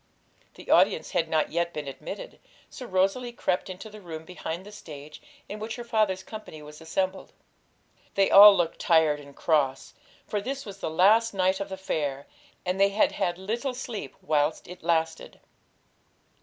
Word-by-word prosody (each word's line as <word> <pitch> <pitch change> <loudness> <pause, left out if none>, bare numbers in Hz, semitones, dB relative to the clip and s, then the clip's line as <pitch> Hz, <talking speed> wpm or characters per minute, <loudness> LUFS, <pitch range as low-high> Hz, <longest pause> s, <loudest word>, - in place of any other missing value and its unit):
The - - -7
audience - - +4
had - - 0
not 155 -1 +1
yet 170 0 -1
been 150 -2 -5
admitted, - - -8 0.3
so 250 - -8
Rosalie 195 +6 +1
crept 190 -5 -1
into 185 +4 -8
the 215 0 -12
room 160 -3 -8
behind 175 0 -6
the 210 - -11
stage, 150 -7 -11 0.3
in 210 - -7
which 220 +1 -5
her 240 - -6
father's 215 -5 0
company 200 -9 -9
was 150 +1 -12
assembled. 185 +4 -2 0.8
They 195 -1 +3
all 200 0 +10
looked 165 -2 -1
tired 160 -3 +3
and 140 -1 -14
cross, 140 -5 0 0.3
for 210 - -2
this 275 +5 -5
was 200 -2 -9
the - - -3
last 205 +7 +4
night 190 0 +2
of 200 0 -4
the 190 - -5
fair, 145 -7 -3 0.4
and 180 +1 -1
they 200 - +6
had 205 +2 +2
had 175 0 -1
little 235 +7 -3
sleep 220 - -6
whilst 150 0 0
it 180 +1 -10
lasted. 165 -1 -1
185 Hz, 170 wpm, -27 LUFS, 160-210 Hz, 0.8 s, all